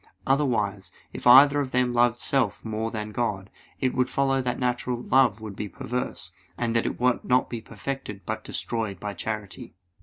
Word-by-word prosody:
Otherwise, 105 -9 0 0.2
if - - -3
either 140 +3 +8
of 140 -2 -1
them 125 -1 +1
loved 120 0 +3
self 135 -2 0
more 110 0 -2
than 105 -1 -5
God, 105 -4 -2 0.3
it 130 -2 0
would 125 0 +1
follow 135 -1 +1
that 125 -1 -2
natural 125 -1 -1
love 120 -4 +3
would 105 -3 -7
be 105 - -5
perverse, 125 -6 -5 0.3
and 115 -1 -1
that 115 - +2
it - - -4
would 125 0 +2
not 125 0 +2
be 120 -2 -4
perfected 110 -1 -6
but 110 0 -4
destroyed 110 -6 -3
by 105 0 -4
charity. 100 -3 -6
120 Hz, 180 wpm, -26 LUFS, 105-125 Hz, 0.3 s, either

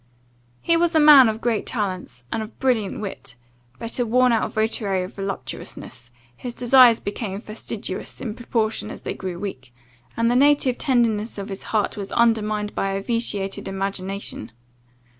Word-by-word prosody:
"He 335 - +3
was 340 0 +2
a - - +6
man 290 -5 +9
of 220 +1 -4
great 230 -3 0
talents, 185 - -3
and 220 - -1
of 220 +1 -8
brilliant 230 -8 0
wit; 190 -11 -7 0.4
but, 230 +2 -4
a 245 - +2
worn 250 +2 +4
out 225 -2 +1
votary 215 -4 0
of 180 - -8
voluptuousness, 195 -10 -6 0.3
his 245 - -7
desires 245 -2 +6
became 200 -1 -4
fastidious 215 -3 -6
in 225 -5 -4
proportion 225 -2 -2
as - - -9
they - - -3
grew 185 -2 -5
weak, 135 -10 -7 0.5
and 230 +1 +2
the - - +2
native 280 -2 +3
tenderness 235 -6 +1
of 200 -1 -5
his 195 0 -6
heart 215 -1 0
was 200 -1 -5
undermined 215 -3 +1
by 195 0 -1
a 195 - -1
vitiated 210 -5 -1
imagination. 195 - -4
215 Hz, 160 wpm, -23 LUFS, 195-240 Hz, 0.5 s, man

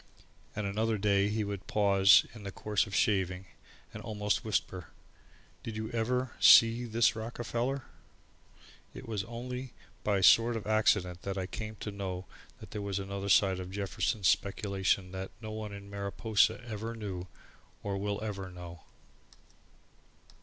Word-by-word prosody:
And 105 - -2
another 110 +3 0
day 100 -1 +2
he 110 +1 -1
would 100 -2 -5
pause 100 -2 +5
in 110 - -11
the 100 - -5
course 105 +2 0
of 100 - -5
shaving, 95 -2 +1 0.5
and - - -7
almost 105 -2 -1
whisper: 95 -5 -2 0.7
"Did 110 -2 -6
you 110 +1 -4
ever 125 +2 -1
see 115 +1 +7
this 115 0 +2
Rockefeller?" 120 +3 -3 1.1
It 130 -1 -9
was 105 -3 -2
only 125 +2 -6 0.3
by 105 -1 +2
a 95 - 0
sort 115 +4 +6
of 110 - -7
accident 105 -4 +2
that 100 0 -4
I 95 - -2
came 110 +3 -6
to 105 - -4
know 95 -2 -5 0.3
that - - -12
there 105 - -4
was 100 -1 -2
another 100 0 -4
side 95 -1 +4
to 90 - -5
Jefferson's 100 +1 -1
speculation 95 -2 +1
that 95 0 -5
no 110 -1 -7
one 110 -1 -5
in 100 0 -9
Mariposa 105 +3 +1
ever 115 0 -5
knew, 95 -5 -5 0.6
or 100 -1 -2
will 100 +1 -2
ever 100 -3 -4
know 90 -1 -9
now. 85 -2 -14
105 Hz, 155 wpm, -31 LUFS, 95-110 Hz, 1.1 s, see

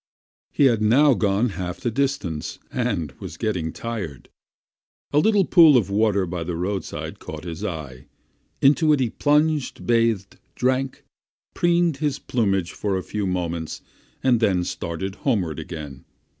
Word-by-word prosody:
He 145 - +3
had 115 -5 +3
now 135 +7 +5
gone 105 +1 +1
half 90 -2 -5
the 120 - -2
distance, 130 - -2
and 100 - -1
was 80 - -8
getting 90 -8 -2
tired. 100 - -6 0.8
A 145 - +5
little 205 +2 +3
pool 165 -7 +7
of 100 -5 0
water 100 -2 +2
by 85 -1 -4
the 85 +1 -4
roadside 95 +3 -4
caught 80 0 -8
his 85 +2 -6
eye. 75 -10 -6 0.6
Into 150 +3 +5
it 145 - +2
he 125 -4 0
plunged, 150 -1 +1
bathed, 115 -5 +1 0.2
drank, 130 +1 -1 0.5
preened 170 -3 +2
his 145 -2 -1
plumage 95 -7 0
for 100 -2 -2
a 95 - -4
few 105 -2 -3
moments, 85 -3 -3 0.4
and 125 -3 +4
then 95 -5 +2
started 95 +3 -4
homeward 95 - -1
again. 75 -4 -8
105 Hz, 145 wpm, -23 LUFS, 90-135 Hz, 0.8 s, pool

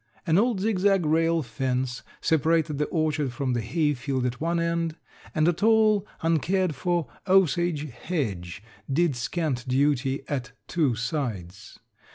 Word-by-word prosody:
An 165 +3 +4
old 230 -2 +2
zigzag 195 -3 +2
rail 165 +1 +2
fence 125 +1 -2 0.2
separated 160 -1 +2
the 150 - +2
orchard 155 -4 0
from 130 0 -1
the 120 - 0
hay 150 +6 +1
field 130 -1 -2
at 125 +1 -3
one 170 +1 0
end 170 -1 -1 0.4
and 155 +1 +3
a 175 - +4
tall 215 +1 +3 0.2
uncared 165 +2 +1
for 170 +2 -1 0.2
osage 175 -4 +2
hedge 100 - -4 0.3
did 160 0 +2
scant 130 +1 -2
duty 135 0 +1
at 130 -4 -3
two 145 -8 +1
sides. 110 - -4
155 Hz, 140 wpm, -26 LUFS, 130-170 Hz, 0.4 s, An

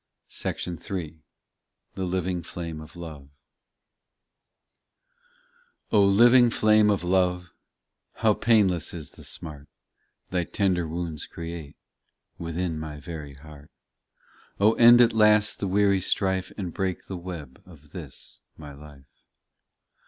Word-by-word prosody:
264 90 +3 -4
POEMS 80 -3 -6 0.8
THE 95 - -3
LIVING 90 0 -2
FLAME 85 -1 -7
OF 80 +2 -13
LOVE: 80 -5 -9 2.6
O 105 -2 +5
LIVING 120 +5 +6
flame 110 -2 +4
of 100 -3 +1
love, 90 -1 +1 0.6
How 110 -2 +3
painless 100 -8 +2
is 80 -4 -8
the - - -15
smart, 75 -4 -7 0.6
Thy 90 -2 0
tender 90 -4 0
wounds 80 -1 -4
create 85 -3 -8 0.6
Within 85 -1 -3
my 75 -1 -7
very 75 -3 -8
heart; 75 0 -14 0.9
Oh 105 +3 +5
end 120 +1 +7
at 120 -1 +4
last 105 -1 +4
the 100 - -2
weary 100 0 +2
strife 95 0 -1
And 90 -5 -5
break 95 -2 -3
the 95 - -6
web 85 -6 -8
of 75 -4 -17
this - - -9 0.2
my 75 -2 -10
life. 70 -1 -14
90 Hz, 120 wpm, -26 LUFS, 80-100 Hz, 2.6 s, end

